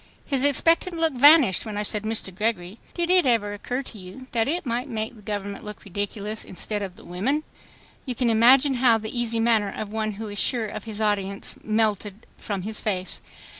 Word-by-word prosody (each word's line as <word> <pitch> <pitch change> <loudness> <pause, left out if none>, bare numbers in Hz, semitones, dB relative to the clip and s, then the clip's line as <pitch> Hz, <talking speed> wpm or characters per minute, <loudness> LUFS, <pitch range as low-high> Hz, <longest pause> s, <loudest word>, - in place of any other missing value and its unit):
His 275 -2 +2
expectant 330 +5 +3
look 325 -2 +1
vanished 280 - +6
when 215 -2 -6
I 210 - -1
said, 210 0 0
"Mr. 215 -3 -3
Gregory, 210 0 -2 0.2
did 345 0 0
it 365 -6 +4
ever 215 -4 +1
occur 250 +6 -4
to 225 -4 -10
you 185 +8 -11
that 230 -1 +1
it 335 +4 -2
might 245 +1 -2
make 220 +1 -4
the 215 - -15
government 205 -1 -5
look 210 0 -9
ridiculous 205 +2 -3
instead 205 +3 -3
of 190 -3 -6
the - - -16
women?" 220 - -1 0.6
You 250 - -2
can 240 -1 +1
imagine 255 +5 +5
bow 235 -3 +5
the 220 +2 -7
easy 235 -1 0
manner 225 -3 +2
of 215 +1 -6
one 215 -1 -2
who 215 +2 -7
is 205 -1 -2
sure 240 -4 +3
of 210 0 -7
his 220 -2 -6
audience 200 -2 -1
melted 215 -1 0
from 200 -3 -5
his 215 +2 -4
face. 185 -3 -2
220 Hz, 205 wpm, -24 LUFS, 205-250 Hz, 0.6 s, vanished